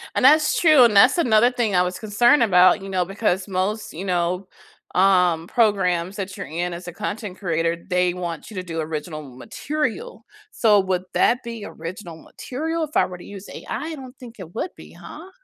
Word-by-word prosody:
And - - +2
that's 305 +3 +5
true, 310 -6 +6
and 225 -4 +4
that's 200 - +6
another 240 -5 +4
thing 235 -5 -1
I 180 - +4
was 180 0 -3
concerned 235 +5 +3
about, 185 -1 +5
you 195 - -8
know, 185 -2 0
because 195 0 -1
most, 200 +3 -2
you 175 +5 -6
know, 180 0 -1 0.5
um, 180 -3 +3
programs 190 -5 +1
that 190 -1 -5
you're - - -7
in 175 +4 -3
as 175 +1 -8
a - - -5
content 210 -2 -5
creator, 165 -2 -1
they 180 -1 +1
want 175 +2 -6
you - - -10
to 185 - -4
do 165 -2 -4
original 155 0 -5
material, 290 - -5 0.3
so 210 -3 +4
would 185 -1 -2
that 250 +2 +2
be 230 -2 -7
original 170 -2 -8
material 320 +5 -4
if 305 -1 -3
I - - +4
were 180 -1 -8
to 175 - -13
use 200 -1 -10
AI? - - -10
I 310 +7 -4
don't 260 -1 -11
think 240 -3 -11
it 175 -2 -10
would 350 - -4
be, - - -14
huh? 340 +5 -12
195 Hz, 200 wpm, -22 LUFS, 180-235 Hz, 0.5 s, true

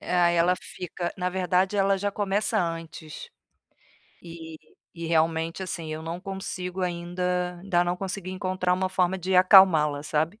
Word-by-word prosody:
Ah, 175 -1 +2
ela 170 +1 +3
fica 175 0 -5
na 180 0 -1
verdade 185 +1 +1
ela 195 0 +3
já 200 +1 -2
começa 205 +1 0
antes. 165 -2 -6 0.9
E 165 -2 -10 0.4
e 170 - -5
realmente, 165 +2 0
assim, 165 -3 -4
eu 155 - -5
não 165 +2 -5
consigo 190 -1 -5
ainda 180 0 -2
ainda 175 -3 +1
não 175 0 0
consegui 190 0 -5
encontrar 185 -1 -1
uma 185 +1 0
forma 185 0 0
de 185 +1 0
acalmá-la, 175 -6 +6
sabe. 160 +7 -1
180 Hz, 150 wpm, -26 LUFS, 165-185 Hz, 0.9 s, acalmá-la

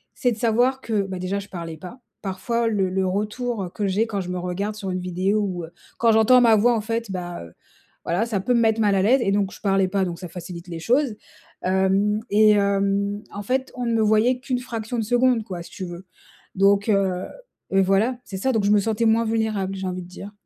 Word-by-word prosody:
c'est 245 - +1
de - - -9
savoir 245 +3 +2
que, 220 -5 0
bah, 190 -1 -5
déjà, 185 +2 -2
je 200 - -10
parlais 165 -3 -6
pas. 185 +10 -10 0.2
Parfois, 230 +5 -1
le 200 -4 +1
le 190 +1 0
retour, 210 +3 -2
heu, - - -7
que 200 +3 -3
j'ai 200 +4 +1
quand 205 -3 -2
je 180 - -6
me 180 - -3
regarde 185 +4 -3
sur 200 -3 -5
une 185 - -2
vidéo 185 +4 0
ou, 185 -4 -3
heu, 160 - -15 0.3
quand 230 -1 +4
j'entends 220 +3 +6
ma 230 -2 +6
voix, 235 +3 +4
en 220 - -1
fait, 230 +1 -3
bah, 175 - -5
heu, 85 -1 -13 0.5
voilà, 180 +7 0
ça 220 -4 -1
peut 250 +6 +1
me - - +4
mettre 225 -1 +2
mal 205 -2 +3
à 190 - +2
l'aise 250 +6 +4
et 195 - +1
donc, 200 -1 +1
je - - -13
parlais 195 -2 +2
pas, 195 0 +1
donc 170 -2 -5
ça 180 - -6
facilite 175 0 -8
les 165 -1 -5
choses. 245 - +1 0.5
Hem 190 +3 +2
et 215 +1 +6
hem, 200 0 +1
en 205 - -5
fait, 260 +5 -1
on 250 -1 -3
ne 235 - 0
me 225 - +2
voyait 220 +4 +3
qu'une 255 -1 -2
fraction 235 -1 -5
de - - 0
seconde 245 +1 +2
quoi, 185 -4 -6
si - - -13
tu 185 - -6
veux. 175 +1 -9 0.5
Donc, 200 +2 +3
heu 190 -3 +1 0.5
et 195 0 +4
voilà, 195 +6 +2
c'est 190 - -6
ça. 265 +8 0
Donc 220 -3 +1
je 205 - +3
me 210 - +5
sentais 225 +2 0
moins 225 +1 +4
vulnérable, 220 -4 -1
j'ai 190 0 -4
envie 185 0 -4
de - - -12
dire. 195 +3 -10
205 Hz, 245 wpm, -23 LUFS, 190-225 Hz, 0.5 s, j'entends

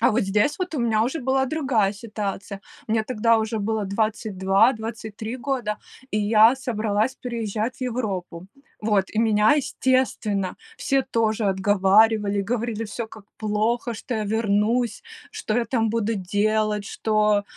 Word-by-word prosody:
А 230 - +4
вот 245 - +2
здесь 210 - +1
вот 365 -3 -3
у - - -1
меня 220 -2 +2
уже 270 +6 -2
была 265 +1 +1
другая 255 -9 +1
ситуация. 200 -2 -5 0.3
Мне 220 0 +1
тогда 230 -1 +2
уже 220 0 -2
было 215 0 -1
22-23 220 +2 0
года, 245 -5 -2 0.3
и 210 - 0
я 215 +3 +5
собралась 220 -2 -1
переезжать 230 -1 -3
в - - -20
Европу. 195 -8 -3 0.3
Вот, 210 -3 +1
и 215 - -3
меня, 215 0 +4
естественно, 255 -8 0 0.2
все 270 -1 +1
тоже 220 -2 0
отговаривали, 205 +2 +3
говорили 225 0 -2
всё, 220 +2 -5
как 215 -2 -13
плохо, 220 +3 0
что 230 +2 -5
я 215 -1 -1
вернусь, 220 +2 0 0.3
что 215 - -2
я 240 - +1
там 225 -2 0
буду 225 0 0
делать, 210 +2 0
что 210 0 +1
220 Hz, 145 wpm, -24 LUFS, 205-235 Hz, 0.3 s, я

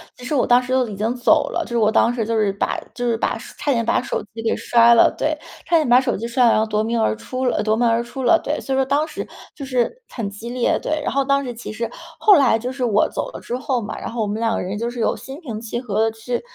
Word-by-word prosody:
其 250 - -14
实 255 - -3
我 270 - +2
当 245 +1 +5
时 250 - -6
都 255 -1 +2
已 210 - -6
经 220 +4 -1
走 295 +5 +3
了， 345 - -2
就 - - -12
是 235 - 0
我 215 -1 +3
当 235 - +3
时 230 -3 -2
就 230 - -2
是 210 -2 +1
把 200 - -1
就 245 - -4
是 235 -1 +1
把 - - -1 0.2
差 290 -2 0
点 230 -2 0
把 - - +2
手 - - -3
机 225 - -6
给 225 - 0
摔 235 0 +5
了。 230 - +5
对， 310 +1 0 0.3
差 345 - +1
点 315 -4 +3
把 245 +1 +6
手 260 -2 -1
机 225 - -5
摔 250 +1 +3
了， 230 - +6
然 - - +3
后 - - +1
夺 215 -1 0
门 230 +1 0
而 105 - +2
出 255 - -5
了， 245 - +1
呃， 210 - 0
夺 215 0 +2
门 240 +2 +1
而 230 +1 +2
出 240 +3 -6
了。 330 +7 +5
对， 300 - -2
所 270 - -3
以 - - +1
说 265 - +2
当 285 +3 +1
时 315 - -6 0.3
就 280 - -8
是 260 - -1
很 225 -5 -4
激 210 +4 -8
烈， 245 0 0
对。 310 0 -2
然 - - -1
后 275 0 +1
当 275 +1 +2
时 250 -2 -5
其 230 -2 -8
实 230 +1 -4 0.3
后 410 -4 +6
来 260 -6 +4
就 245 +3 -4
是 260 -1 -2
我 210 -3 +2
走 - - -4
了 - - -9
之 245 - -4
后 255 -2 -1
嘛， 205 - -6
然 - - -5
后 235 0 -3
我 215 - 0
们 210 +2 -3
两 225 0 +1
个 - - -2
人 190 +3 -4
就 235 +2 -2
是 240 -1 -5
有 - - +1
心 270 +4 -9
平 230 -10 -6
气 235 +2 -4
和 215 -4 -2
地 - - -7
去 240 +2 -3
240 Hz, 340 characters per minute, -21 LUFS, 225-265 Hz, 0.3 s, 把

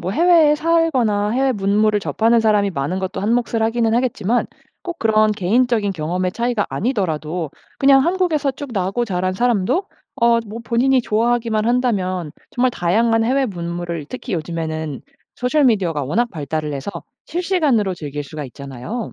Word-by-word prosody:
뭐 185 - -3
해외에 325 0 +5
살거나 270 -11 +1
해외 265 +3 +2
문물을 210 +1 +2
접하는 225 +3 +2
사람이 210 -2 +2
많은 170 +3 -2
것도 190 0 -4
한 205 +3 0
몫을 235 -2 0
하기는 225 0 +1
하겠지만 240 -2 0 0.4
꼭 345 -1 -6
그런 215 -1 +3
개인적인 215 +1 +1
경험의 180 +3 -2
차이가 235 -1 -1
아니더라도 165 - -2 0.3
그냥 270 -1 +5
한국에서 335 -6 +1
쭉 285 0 -8
나고 195 +4 -1
자란 185 -3 -1
사람도 240 - +1 0.4
어 235 0 +5
뭐 225 +3 -7
본인이 255 +3 +2
좋아하기만 230 -1 0
한다면 190 - 0 0.2
정말 250 +1 +1
다양한 225 +4 +1
해외 265 +2 +2
문물을 170 -4 -4
특히 250 -5 -5
요즘에는 160 -2 -4 0.3
소셜 280 +4 +1
미디어가 180 - +1
워낙 230 - 0
발달을 155 -1 -3
해서 140 +8 -4 0.4
실시간으로 310 - +1
즐길 145 -3 -5
수가 150 +1 -7
있잖아요. 140 - -7
215 Hz, 375 characters per minute, -20 LUFS, 180-245 Hz, 0.4 s, 해외에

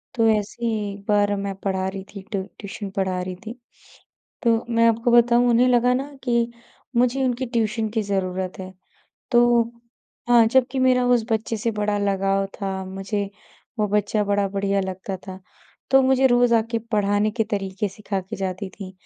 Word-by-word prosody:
तो 225 -2 +3
ऐसे 215 +2 -1
ही 215 -3 -1
एक 200 0 -12
बार 205 -1 +3
मैं 200 0 -3
पढ़ा 190 -1 -1
रही 190 0 -5
थी 200 - -6
ट्यू 195 -3 -1 0.2
ट्यूशन 200 0 -6
पढ़ा 190 -2 -1
रही 180 0 -5
थी। 230 +3 -7 0.9
तो 230 -1 +2
मैं 230 -1 +4
आपको 230 +2 +1
बताऊँ, 240 +1 +5
उन्हें 240 +2 +4
लगा 245 0 +3
ना 275 +3 -3
कि 235 -1 +1 0.4
मुझे 250 +2 +2
उनकी 255 0 -1
ट्यूशन 225 -2 -1
की 220 0 -1
ज़रूरत 190 -2 -2
है। 185 0 -8 0.6
तो 240 -1 +5 0.7
हाँ, 240 -2 +6
जबकि 260 +3 +2
मेरा 255 -1 +3
उस 245 -2 +3
बच्चे 225 +1 0
से 225 +2 -1
बड़ा 210 0 0
लगाव 195 -1 +1
था, 190 -2 -4
मुझे 195 +2 -4 0.5
वो 210 - +2
बच्चा 210 +1 +1
बड़ा 200 0 +1
बढ़िया 200 0 0
लगता 190 0 -4
था। 190 0 -8 0.5
तो 270 0 +7
मुझे 265 0 +4
रोज़ 245 -1 +4
आके 230 +1 +1
पढ़ाने 205 0 +2
के 225 +1 -1
तरीके 195 0 -2
सिखा 200 0 -4
के 185 - -8
जाती 190 0 -3
थीं, 190 -1 -9
210 Hz, 175 wpm, -23 LUFS, 195-235 Hz, 0.9 s, तो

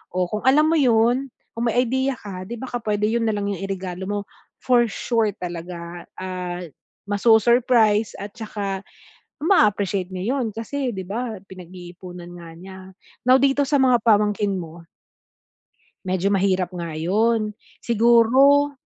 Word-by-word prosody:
Oh, 180 -1 0
kung 215 - -1
alam 285 +3 +6
mo 330 - +3
yun, 245 +1 +3 0.2
kung 235 +1 -2
may 245 +2 +2
idea 260 +2 -1
ka 185 -5 -8
di 235 - -5
baka 245 0 -5
pwede 210 -2 -2
yun 230 -1 0
nalang 205 -2 -1
yung 195 - -4
iregalo 190 -1 -5
mo, 205 0 -2 0.4
for 240 -2 +4
sure 220 -1 -1
talaga, 175 -1 -7
ah, 180 -1 -5 0.5
ma-su-surprise 225 0 +3
at 200 +1 -7
tsaka 205 -3 -5 0.7
ma-appreciate 205 - +2
nya 185 0 -5
'yon, 250 -1 -1
kasi 250 +5 -4
'di 190 -5 -5
ba 225 +2 -4
pinag-iipunan 180 -1 -11
nga 170 -1 -11
niya. 190 +2 -11 0.5
Now 255 - +8
dito 275 +1 +2
sa 285 +1 +2
mga 255 -3 +3
pamangkin 210 -2 +2
mo 170 -1 -9 1.2
medyo 190 +2 0
mahirap 190 -2 +1
nga 170 -3 -5
yun. 215 +6 +1 0.3
Siguro 240 +5 +4
210 Hz, 140 wpm, -22 LUFS, 185-240 Hz, 1.2 s, Now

